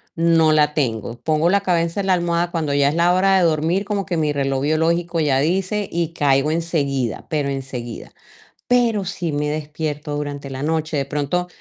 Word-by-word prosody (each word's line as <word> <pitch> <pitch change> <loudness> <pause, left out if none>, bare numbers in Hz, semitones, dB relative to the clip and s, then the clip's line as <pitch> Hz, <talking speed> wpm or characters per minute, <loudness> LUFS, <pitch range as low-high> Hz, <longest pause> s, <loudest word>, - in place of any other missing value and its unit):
no 165 -1 +4
la 150 -1 +3
tengo, 115 -5 -1
pongo 160 +2 +2
la 200 +1 +3
cabeza 170 0 0
en - - -4
la 185 - +4
almohada 175 0 0
cuando 160 -5 -1
ya 140 0 +3
es - - -2
la 175 +1 +3
hora 195 +1 +3
de - - +2
dormir, 165 +5 +1
como 200 -1 -2
que 180 - -2
mi 155 -2 +1
reloj 135 -2 -1
biológico 165 +3 +1
ya 140 -4 +2
dice 190 +6 0
y, 170 -1 -2
caigo 140 -1 +2
enseguida, 145 -7 -1
pero 145 -3 -1
enseguida. 130 -4 -6 0.6
Pero, 235 -5 +2
sí 180 -3 -3
me 150 0 -1
despierto 150 -1 -4
durante 145 -1 -5
la 135 +1 -5
noche, 160 -1 -1
de 140 - 0
pronto, 150 +5 -2
155 Hz, 190 wpm, -20 LUFS, 145-175 Hz, 0.6 s, no